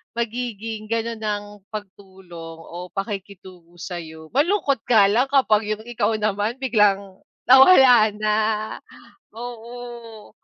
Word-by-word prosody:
magiging 230 -2 -4
gano'n 230 0 -2
ang 205 -1 -2 0.3
pagtulong 190 -5 -10
o 175 +2 -9
pakikitungo 190 -3 -8
sa'yo. 160 -3 -8
Malungkot 285 - +1
nga 220 -4 +5
lang 235 +6 +2
kapag 225 -6 +3
yung 215 0 -3
ikaw 235 -3 -1
naman 210 +4 -2
biglang 200 -6 +1 0.3
nawala 260 -5 +7
na, 215 0 0 1.0
oo. 235 -1 -9
215 Hz, 105 wpm, -22 LUFS, 195-240 Hz, 1.0 s, nawala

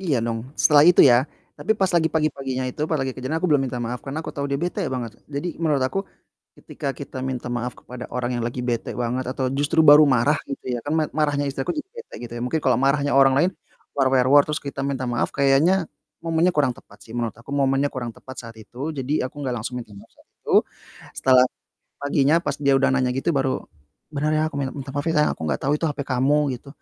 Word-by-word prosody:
Iya 165 -8 0
dong, 115 -1 -2 0.2
setelah 150 -1 +6
itu 180 - +6
ya. 125 -4 +7 0.4
Tapi 180 +10 -1
pas 190 -2 +1
lagi 165 -2 +3
pagi-paginya 135 -5 -1
itu, 135 - -11
pa - - 0
lagi 135 -2 -2
kejadian, 130 +5 -3
aku 180 - 0
belum 145 -2 +4
minta 125 - -5
maaf 120 0 -4
karena 135 +3 -5
aku - - -6
tahu 140 0 -3
dia 140 - 0
bete 175 +7 -3
banget. 125 -4 -4 0.2
Jadi, 145 +4 -3
menurut 150 -5 +1
aku 130 +9 -1 0.6
ketika 145 - -6
kita 140 -2 -8
minta 130 -2 -4
maaf 120 0 -2
kepada 125 0 -9
orang 125 0 -2
yang - - -2
lagi 120 +1 -4
bete 120 -2 -2
banget 125 +2 -2
atau 130 0 -1
justru 145 +3 +2
baru 150 0 +9
marah 130 +3 +3
gitu 140 - -6
ya, - - -2
kan 145 - -3
ma 160 - +2
marahnya 145 -2 +1
istri 135 0 -4
aku - - -1
jadi 340 +6 -5
bete 465 - -10
gitu 120 - -9
ya, - - -5
mungkin 155 +6 -1
kalo 130 -3 +4
marahnya 140 +1 +2
orang 135 -1 +6
lain 175 +6 +3 0.5
war 135 -2 +3
wer 130 -2 +4
wor, 145 0 +8
terus 150 +1 -2
kita 140 -1 -6
minta 135 -2 -2
maaf 120 0 0
kayaknya 145 +7 +3 0.4
momennya 165 +2 +2
kurang 140 -4 +3
tepat - - -18
sih. 115 - -12
Menurut 115 -3 -2
aku, 115 +4 -13
momennya 140 0 +2
kurang 120 -2 -4
tepat 130 -1 -11
saat 115 - -13
itu, 125 +8 -6
jadi 135 0 -1
aku 145 +2 -8
gak 125 -2 -1
langsung 125 +3 -5
minta 110 -3 -12
maaf 100 - -14
saat - - -26
itu. - - -4 0.6
Setelah 130 -1 +5 0.5
paginya 145 +1 +2
pas 170 - -3
dia 140 -1 +1
udah 135 0 +3
nanya 130 -2 +1
gitu 135 +6 -1
baru, 135 -1 +1 0.6
"Bener 150 +2 0
ya, - - +2
aku 155 - -6
minta 135 -2 -2
minta 140 -1 -7
maaf 145 - -1
ya 165 - +2
sayang, 150 - +3
aku - - -11
gak - - 0
tahu 135 - +1
itu 165 - -1
hape 145 - -4
kamu," 135 +2 +2
gitu, 125 +3 -12
140 Hz, 235 wpm, -23 LUFS, 125-150 Hz, 0.6 s, baru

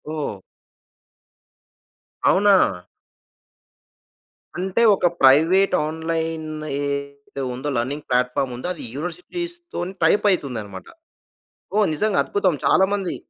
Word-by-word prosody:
ఓహ్! 145 -9 -3 1.9
అవునా! 200 0 +5 2.0
అంటే 190 +5 -1
ఒక - - -1 0.2
ప్రైవేటు 165 +9 +5
ఆన్‌లైన్ 160 0 -3 0.3
ఏదైతే 140 -1 -5
ఉందో 130 +4 -4
లెర్నింగ్ 140 +5 -3
ప్లాట్‌ఫార్మ్ 125 +1 0
ఉందో 125 +8 -5
అది 175 - -10
యూనివర్సిటీస్‌తోని 345 - -6
టైపయితుందనమాట. 125 - 0 0.9
ఓహ్! 210 -1 +4
నిజంగా 210 +5 0
అద్భుతం. 190 -4 +1
చాలామంది 190 -1 +2
160 Hz, 80 wpm, -22 LUFS, 140-195 Hz, 2.0 s, అవునా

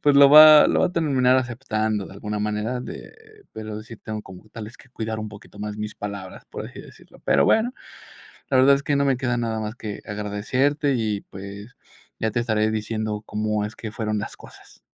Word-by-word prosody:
pues, 145 -1 +4
lo 140 0 +8
va 155 0 +10
lo - - +2
va - - +4
a - - -5
terminar 130 -6 +3
aceptando 110 -5 -1
de - - -12
alguna 105 +1 -4
manera 105 +4 -2
de - - -9 0.4
pero, 110 -1 -6
sí 110 +1 -11
tengo 110 0 -6
como 95 +2 -13
tales 110 +1 -9
que - - -18
cuidar 110 -3 -4
un 110 0 -5
poquito 105 -1 -14
más 105 0 -5
mis 105 0 -5
palabras, 100 -2 -7
por - - -7
así - - -10
decirlo. - - -17
Pero, - - +4
bueno, 240 +4 +2 0.8
la 130 - +3
verdad 135 +2 +6
es 140 - -4
que 145 - 0
no 140 - +2
me 135 -1 +3
queda 120 -1 -1
nada 115 -2 -2
más 105 +1 -5
que 105 -3 -7
agradecerte 125 +8 0
y, 110 -4 -1
pues, 100 +4 -9 0.4
ya 110 - 0
te 120 - 0
estaré 110 -2 +1
diciendo 110 -1 -3
cómo 105 0 -1
es 105 - -7
que 110 - -6
fueron 110 -1 -2
las 100 - -6
cosas. - - -16
110 Hz, 210 wpm, -23 LUFS, 105-130 Hz, 0.8 s, va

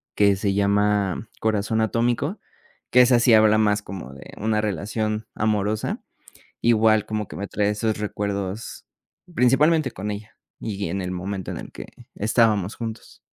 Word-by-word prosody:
que 100 -1 +4
se 100 0 -1
llama 100 0 +1
"Corazón 110 0 0
atómico", 120 - 0 0.5
que 125 - +7
esa 125 -1 +5
sí 120 -1 +4
habla 110 0 +6
más 105 -1 +2
como 90 -9 -8
de 70 - -12
una 110 0 0
relación 110 +1 -2
amorosa, 105 0 -1 0.6
igual 110 -2 +4
como 105 -2 -3
que - - -10
me 100 0 -4
trae 105 -1 0
esos 110 +1 -1
recuerdos, 100 0 -4 0.5
principalmente 150 +4 +3
con 105 +3 -5
ella, 105 +2 -7 0.3
y 100 -3 -4
en 95 +3 -2
el 90 0 -4
momento 95 +1 -4
en - - -5
el - - -9
que - - -9 0.3
estábamos 105 -2 +2
juntos. 115 -1 -7
105 Hz, 155 wpm, -23 LUFS, 100-110 Hz, 0.6 s, que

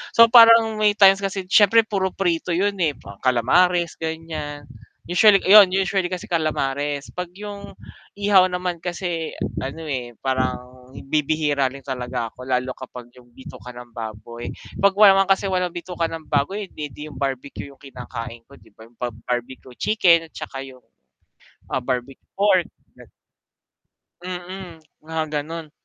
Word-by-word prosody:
So 230 0 +8
parang 230 -2 +7
may 210 -1 +4
times 195 -1 +6
kasi 195 -1 -3
siyempre 210 +3 +5
puro 190 -2 -1
prito 175 -2 -1
'yon 200 +4 +1
eh, 150 -3 0 0.3
calamares 170 +8 +2
ganyan. 155 -3 -6 0.4
Usually 195 +3 +5
'yon, 200 -1 +8
usually 190 0 0
kasi 180 -1 -5
calamares 145 -3 -2
'pag 180 -1 -5
'yong 200 0 -9 0.4
ihaw 200 -2 +5
naman 180 -1 -3
kasi 175 -2 -4 0.3
ano 140 +5 -6
eh 125 -4 -4
parang 130 -1 -3 0.2
bibihira 150 -2 +1
lang 135 0 -12
talaga 125 -3 -4
ako 125 - -11
lalo 130 0 0
kapag 125 -2 -10
'yong 125 -1 -18
bituka 125 0 -11
ng 120 0 -12
baboy. 115 +1 -7 0.3
'Pag 200 0 +4
wala 205 -2 +9
naman 195 - +3
kasi 195 +1 +2
walang 180 -2 -1
bituka 175 -1 -3
ka - - -8
ng 160 -1 -7
baboy, 190 +9 -1
eh - - -33
'di 150 0 -8
'yong - - -13
barbecue 140 0 -4
'yong 135 - -20
kinakain 120 -3 -8
ko 140 - -15
'di - - -22
ba 110 - -14
'yong 120 - -28
bab 120 -3 -4
barbecue 125 +1 -5
chicken 170 -6 +3
at - - -48
saka 135 - -7
'yong, 130 -2 -13 0.9
ah, - - 0
barbecue 125 +1 -4
pork, 195 -3 +3 0.3
ganun. - - -16 1.1
Mm, 180 -1 -7 0.2
mga 160 0 -3
gano'n. 155 +1 -5
160 Hz, 155 wpm, -22 LUFS, 130-185 Hz, 1.1 s, wala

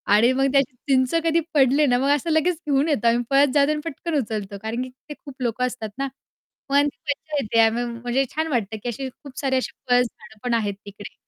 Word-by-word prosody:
आणि 235 +4 +5
मग 270 +1 +2
त्याची 275 -2 +2
चिंच 260 0 +3
कधी 330 0 +3
पडले 280 +1 +4
ना, 245 -2 +3
मग 275 +1 +1
असं 295 +4 -3
लगेच 330 +3 +2
घेऊन 285 +2 +2
येतो. 235 -5 +1
आम्ही 240 +1 +3
पळत 275 -1 +4
जातो 290 0 +4
आणि 300 0 -1
पटकन 330 +1 -4
उचलतो. 205 -3 -5
कारण 225 +3 -2
की 255 - -7 0.2
ते - - -4
खूप 280 -2 -13
लोकं 245 +2 0
असतात 225 -4 -6
ना, 275 0 -1 0.6
पण 285 +1 +4
ती - - -7
मज्जा 305 +1 -5
येते. 230 -1 0
आम्ही 230 +2 +1
म्हणजे 240 +3 -1
छान 315 +1 0
वाटतं, 225 -7 -1
की 245 - -2
अशी 260 +3 -4
खूप 265 +1 -12
सारे 270 -2 0
अशी 255 - -2 0.2
पळस 245 0 +5
झाडं 220 -1 -17
पण 245 -1 0
आहेत 210 -3 0
तिकडे. 205 0 -10
260 Hz, 230 wpm, -23 LUFS, 235-285 Hz, 0.6 s, आणि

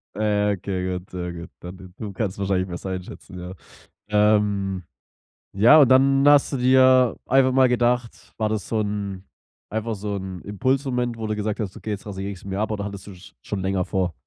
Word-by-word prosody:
Ah, - - -7 0.3
ja, - - +2
okay, 95 -1 -3
gut, 90 - -20
sehr 90 -1 -5
gut. 85 0 -9
Dann 90 +1 -9
d 95 -1 -12
du 105 -2 -6
kannst 95 0 -3
wahrscheinlich 95 -2 0
besser 90 +1 -6
einschätzen, 90 0 -8
ja. 90 +1 -7 0.6
Ähm 105 -3 +2 0.7
ja 115 +10 +7
und 130 - +5
dann 135 +1 +5
hast 145 0 +4
du - - 0
dir 130 -1 +5
einfach 130 0 +4
mal 130 0 +5
gedacht, 120 -1 -1
war 110 -1 0
das 105 -4 -3
so 110 - -1
'n 100 -2 -4 0.5
einfach 110 +1 -3
so 100 0 -4
'n 95 -2 -6
Impulsmoment, 125 +2 -1
wo 110 -1 -4
du 110 - -1
gesagt 105 +1 -3
hast: 100 -3 -4
„Okay, 110 - -6
jetzt 100 -1 -5
rasiere 100 -1 -5
ich's 95 - -11
mir 95 0 -4
ab." 110 - -1
Oder 100 -1 -3
hattest 100 -1 -7
du's 95 -2 -13
schon 100 - -4
länger 95 -1 -1
vor? 95 -3 -1
105 Hz, 200 wpm, -23 LUFS, 95-120 Hz, 0.7 s, ja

